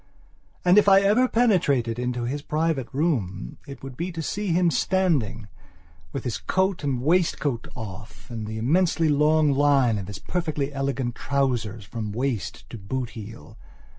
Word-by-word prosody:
And, 180 +3 +7
if 205 - +4
I 195 0 +7
ever 215 +6 +4
penetrated 145 - +2
into 125 -1 -2
his 140 +5 -2
private 155 -4 -1
room 115 - -1
it 140 -1 -10
would 135 -1 -7
be 175 +5 -3
to 165 -1 -4
see 205 +6 -3
him 175 -1 +3
standing, 145 - 0 0.6
with - - -4
his 125 - -3
coat 190 -3 0
and 130 -4 -1
waistcoat 155 -6 +1
off 105 -2 -9
and 110 -2 -5
the 110 +1 -5
immensely 160 +6 +2
long 150 +1 +4
line 135 -5 +3
of 95 - -6
his 105 -1 -6
perfectly 150 -5 -2
elegant 135 -3 -2
trousers 120 -7 -1
from 105 +1 -5
waist 125 -2 -3
to 115 - -7
boot 120 +5 -4
heel. 110 +1 -10
135 Hz, 160 wpm, -25 LUFS, 115-165 Hz, 0.6 s, And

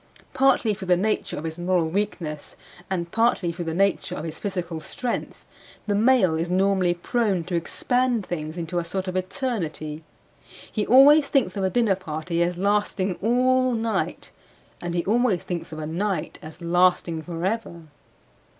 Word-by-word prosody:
Partly 260 -5 +3
through 190 -1 -7
the 180 -1 +4
nature 215 +4 -1
of 150 - -5
his 160 +1 -5
moral 175 -2 +1
weakness, 165 -5 -3 0.3
and 170 -3 -2
partly 225 -6 +2
through 170 0 -6
the 165 - -2
nature 195 +2 +1
of - - -5
his 160 -1 -6
physical 180 -5 -3
strength, 240 +10 -4 0.4
the 205 - 0
male 220 -4 +4
is 165 +2 -1
normally 185 -1 +2
prone 195 0 0
to 180 +1 -4
expand 245 +6 0
things 155 -1 -5
into 175 +1 -2
a - - -2
sort 190 +3 -4
of 185 - -3
eternity; 180 - -3 0.7
he 210 - -1
always 280 +4 +7
thinks 265 -10 +1
of 195 - -2
a 190 - +2
dinner 225 -3 +2
party 165 -1 -3
as 175 0 0
lasting 200 -1 +1
all 255 +3 +3
night; 225 -1 -2 0.5
and 175 0 -3
he 170 - 0
always 220 -3 +2
thinks 175 -2 -5
of 155 - -7
a 155 - -4
night 180 +2 -2
as 155 +2 -11
lasting 175 -1 +2
forever. 175 +1 -3
185 Hz, 165 wpm, -24 LUFS, 170-220 Hz, 0.7 s, always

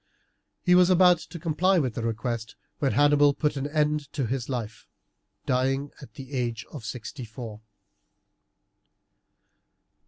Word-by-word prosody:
He 180 - +4
was 180 0 +6
about 180 -2 +6
to 170 - -9
comply 170 +4 +2
with 130 -8 0
the 115 - -4
request 115 0 -3 0.2
when 135 -3 +1
Hannibal 145 0 +4
put 150 -1 0
an 140 +1 -2
end 150 -1 0
to 140 -3 -1
his 125 +2 -3
life, 115 -4 -5 0.6
dying 135 +2 0
at 140 - -13
the 135 -1 -10
age 120 -3 -2
of 145 -7 -8
sixty 125 +4 -6
four. 110 -2 -8
140 Hz, 135 wpm, -26 LUFS, 120-150 Hz, 0.6 s, was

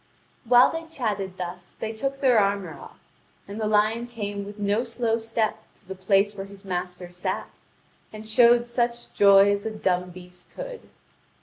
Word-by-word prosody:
'" - - -38
While 245 +1 +7
they 325 0 -5
chatted 205 - -3
thus 180 0 -7
they 220 - -5
took 275 +5 -3
their 250 -5 +5
armour 200 -4 0
off, - - -13 0.5
and 205 +2 -6
the 215 - 0
lion 215 +3 +2
came 205 -4 -5
with 205 +1 -9
no 205 +3 0
slow 230 -1 -1
step 225 -1 -1 0.2
to - - -25
the 190 - -5
place 195 +2 +2
where 195 -1 -7
his 200 0 -14
master 180 -1 -4
sat, 180 +1 -4 0.6
and 215 0 -10
showed 235 +2 +5
such 240 0 -2
joy 200 0 +6
as 200 0 -1
a 220 - -2
dumb 180 -4 -1
beast 180 0 -13
could. - - -8
210 Hz, 180 wpm, -25 LUFS, 195-235 Hz, 0.6 s, While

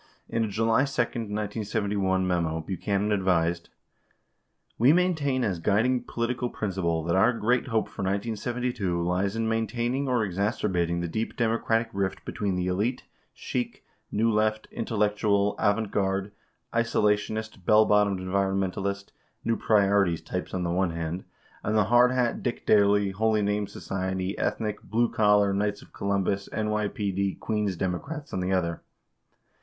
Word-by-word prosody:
In 115 - 0
a - - 0
July 115 +5 +2
2, 135 -3 0
1971 105 -4 -1
memo, 85 -3 0
Buchanan 100 +4 -1
advised: 90 -4 +1 1.1
[We] 125 +6 +6
maintain 160 -8 +1
as 95 -7 -1
guiding 120 +7 +2
political 120 +1 -2
principle 90 -7 -1
that 85 +2 0
our 95 +6 +5
great 120 +3 +1
hope 115 -3 0
for - - -8
1972 105 0 -1
lies 90 +4 0
in 115 0 0
maintaining 120 +4 -1
or 125 -3 +2
exacerbating 90 -3 0
the 85 - -2
deep 110 +7 -3
Democratic 115 0 +1
rift 95 -1 -2
between 100 -3 -2
the 90 0 -1
elite, 105 +8 -1 0.3
chic, - - -4 0.3
New 115 +2 +2
Left, 110 0 +1
intellectual 105 -2 +1
avant 105 0 +1
garde, 95 0 0 0.4
isolationist, 110 -2 0
bell 110 +4 +5
bottomed 105 -2 +3
environmentalist, 95 +1 -1 0.4
new 115 - +2
priorities 100 -6 +2
types - - -4
on 90 - -1
the 85 - -1
one 90 +1 +1
hand— 85 +2 -4 0.4
and 105 +1 0
the 105 - +5
hard 120 +1 +7
hat, 125 -2 0
Dick 120 - -3
Daley, 100 -1 +4
Holy 110 +1 +1
Name 105 0 0
Society, 95 0 -3
ethnic, 105 -2 -1
blue 115 +3 +1
collar, 105 -2 +4
Knights 105 +1 -1
of - - -20
Columbus, 100 0 -1
N 110 0 -1
YPD, 100 -2 -1
Queens 105 -3 -1
Democrats 140 - -4
on - - -1
the 90 +1 -1
other. 85 -3 0
105 Hz, 145 wpm, -27 LUFS, 95-115 Hz, 1.1 s, hard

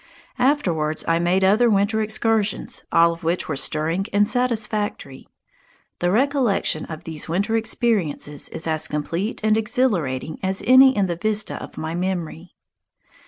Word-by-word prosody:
Afterwards 175 - 0
I 165 0 +2
made 180 +3 +1
other 215 +5 +4
winter 205 +1 +1
excursions, 215 -1 -1
all 170 0 +4
of 165 - -13
which 170 +2 -1
were 155 - -2
stirring 165 +7 0
and 205 0 +3
satisfactory. 215 - -2 0.7
The 175 - +1
recollection 245 - +1
of 160 -1 -8
these 160 -1 -6
winter 200 +7 0
experiences 205 - -1
is 160 - -5
as 160 -1 0
complete 165 +8 -3
and 215 0 +3
exhilarating 195 - -1
as 190 0 -2
any 260 0 +6
in 200 - +2
the 175 -2 -3
vista 215 +2 -1
of - - -10
my 160 +1 -4
memory. 175 -1 -4
190 Hz, 145 wpm, -22 LUFS, 165-220 Hz, 0.7 s, any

